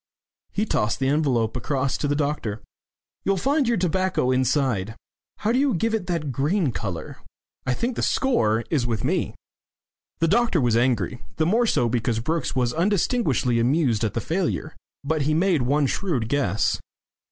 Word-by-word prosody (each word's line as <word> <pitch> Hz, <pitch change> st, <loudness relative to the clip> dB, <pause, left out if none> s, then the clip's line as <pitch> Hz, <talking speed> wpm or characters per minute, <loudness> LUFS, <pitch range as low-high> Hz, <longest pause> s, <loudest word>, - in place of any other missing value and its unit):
He 210 Hz, -, 0 dB
tossed 105 Hz, -, 0 dB
the 135 Hz, -, 0 dB
envelope 135 Hz, -6 st, +1 dB
across 130 Hz, +1 st, -1 dB
to 145 Hz, -, 0 dB
the 145 Hz, -, +1 dB
doctor. 140 Hz, -8 st, -2 dB, 0.6 s
"You'll 195 Hz, 0 st, +1 dB
find 275 Hz, -, +1 dB
your 235 Hz, -1 st, +2 dB
tobacco 185 Hz, -6 st, +1 dB
inside 130 Hz, -5 st, +1 dB, 0.4 s
how 215 Hz, -, 0 dB
do 250 Hz, -, +2 dB
you 275 Hz, -5 st, +2 dB
give 225 Hz, +6 st, 0 dB
it 215 Hz, -5 st, -1 dB
that 165 Hz, -6 st, -2 dB
green 150 Hz, -, +1 dB
colour? 95 Hz, -7 st, -5 dB, 0.5 s
I 125 Hz, -, +1 dB
think 240 Hz, -, -2 dB
the -, -, -2 dB
score 115 Hz, -, +2 dB
is 135 Hz, -7 st, +1 dB
with 115 Hz, -3 st, -2 dB
me." -, -, -1 dB, 0.8 s
The 165 Hz, -, +1 dB
doctor 225 Hz, -1 st, +2 dB
was 120 Hz, -4 st, +2 dB
angry, 120 Hz, -1 st, +1 dB
the 160 Hz, -, +1 dB
more 230 Hz, +7 st, +2 dB
so 120 Hz, -, +2 dB
because 115 Hz, 0 st, 0 dB
Brookes 155 Hz, +3 st, -2 dB
was 125 Hz, -2 st, +1 dB
undisguisedly 165 Hz, -, +1 dB
amused 125 Hz, -2 st, +2 dB
at 110 Hz, -, -1 dB
the 115 Hz, -, 0 dB
failure. 165 Hz, -, -2 dB, 0.3 s
But 155 Hz, +2 st, 0 dB
he 155 Hz, +2 st, +1 dB
made 170 Hz, -3 st, +2 dB
one 140 Hz, +4 st, +2 dB
shrewd 135 Hz, -, -1 dB
guess. 110 Hz, -8 st, +1 dB
145 Hz, 170 wpm, -24 LUFS, 120-180 Hz, 0.8 s, your